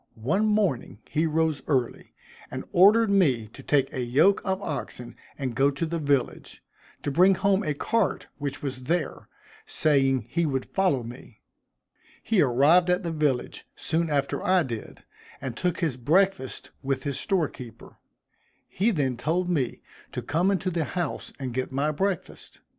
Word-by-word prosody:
One 175 Hz, -, 0 dB
morning 200 Hz, -, 0 dB
he 160 Hz, +2 st, 0 dB
rose 160 Hz, -1 st, 0 dB
early, 130 Hz, -5 st, -1 dB, 0.3 s
and -, -, -5 dB
ordered 210 Hz, +4 st, +6 dB
me 135 Hz, -, +3 dB
to -, -, -12 dB
take 140 Hz, -2 st, +1 dB
a 130 Hz, -, -2 dB
yoke 140 Hz, +12 st, +3 dB
of 190 Hz, -1 st, -1 dB
oxen 140 Hz, -6 st, -5 dB, 0.2 s
and 130 Hz, -4 st, -3 dB
go 135 Hz, +3 st, +3 dB
to 140 Hz, +3 st, -2 dB
the 165 Hz, +1 st, -3 dB
village, 140 Hz, -4 st, -1 dB, 0.4 s
to 145 Hz, -, -1 dB
bring 185 Hz, +6 st, +5 dB
home 195 Hz, +1 st, +2 dB
a 150 Hz, -5 st, -1 dB
cart 225 Hz, +7 st, 0 dB
which 145 Hz, -1 st, -4 dB
was 130 Hz, -2 st, -4 dB
there, 165 Hz, +2 st, -2 dB, 0.4 s
saying 135 Hz, -5 st, +2 dB
he 170 Hz, +8 st, 0 dB
would 135 Hz, -2 st, -1 dB
follow 180 Hz, -10 st, +1 dB
me. 120 Hz, -1 st, -11 dB, 0.8 s
He 220 Hz, -5 st, +2 dB
arrived 145 Hz, +7 st, +4 dB
at 180 Hz, +2 st, +2 dB
the 170 Hz, -, -2 dB
village 150 Hz, -6 st, -1 dB
soon 165 Hz, +1 st, 0 dB
after 140 Hz, -2 st, -1 dB
I 185 Hz, -1 st, +3 dB
did, 115 Hz, -6 st, -7 dB, 0.4 s
and 130 Hz, -4 st, -5 dB
took 180 Hz, +5 st, -1 dB
his 155 Hz, -7 st, 0 dB
breakfast 175 Hz, +3 st, +1 dB
with 135 Hz, -1 st, -2 dB
his 140 Hz, -2 st, -2 dB
store 190 Hz, -7 st, +1 dB
keeper. 120 Hz, -4 st, -12 dB, 0.7 s
He 205 Hz, +5 st, +1 dB
then 140 Hz, -, 0 dB
told 170 Hz, +8 st, 0 dB
me 135 Hz, -8 st, -1 dB, 0.3 s
to -, -, -4 dB
come 170 Hz, +6 st, +1 dB
into 190 Hz, -1 st, 0 dB
the 165 Hz, -2 st, 0 dB
house 175 Hz, -2 st, -4 dB
and 130 Hz, -3 st, -5 dB
get 130 Hz, +1 st, -2 dB
my 140 Hz, +3 st, 0 dB
breakfast. 190 Hz, +4 st, -3 dB
150 Hz, 165 wpm, -26 LUFS, 130-180 Hz, 0.8 s, ordered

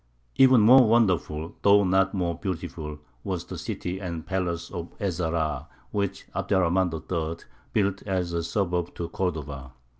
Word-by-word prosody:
Even 130 Hz, -3 st, +7 dB
more 125 Hz, +3 st, +8 dB
wonderful, 90 Hz, -8 st, +1 dB
though 100 Hz, 0 st, +6 dB
not 95 Hz, +1 st, +3 dB
more 90 Hz, -2 st, 0 dB
beautiful, 85 Hz, -4 st, -5 dB, 0.3 s
was -, -, -3 dB
the -, -, -7 dB
city 90 Hz, +1 st, -4 dB
and 85 Hz, -4 st, -5 dB
palace 85 Hz, -3 st, -2 dB
of 85 Hz, -2 st, -5 dB
Ez 95 Hz, -5 st, -2 dB
Zahrā, 80 Hz, -3 st, -1 dB, 0.2 s
which 100 Hz, -2 st, -2 dB
Abd -, -, -1 dB
er 95 Hz, -, +4 dB
Rahmān 90 Hz, +1 st, +2 dB
III. 80 Hz, 0 st, -4 dB, 0.3 s
built 100 Hz, -2 st, +1 dB
as 90 Hz, -3 st, -1 dB
a 85 Hz, -, 0 dB
suburb 90 Hz, 0 st, -1 dB
to 85 Hz, -, -4 dB
Cordova. 70 Hz, -8 st, -4 dB
90 Hz, 155 wpm, -26 LUFS, 85-95 Hz, 0.3 s, more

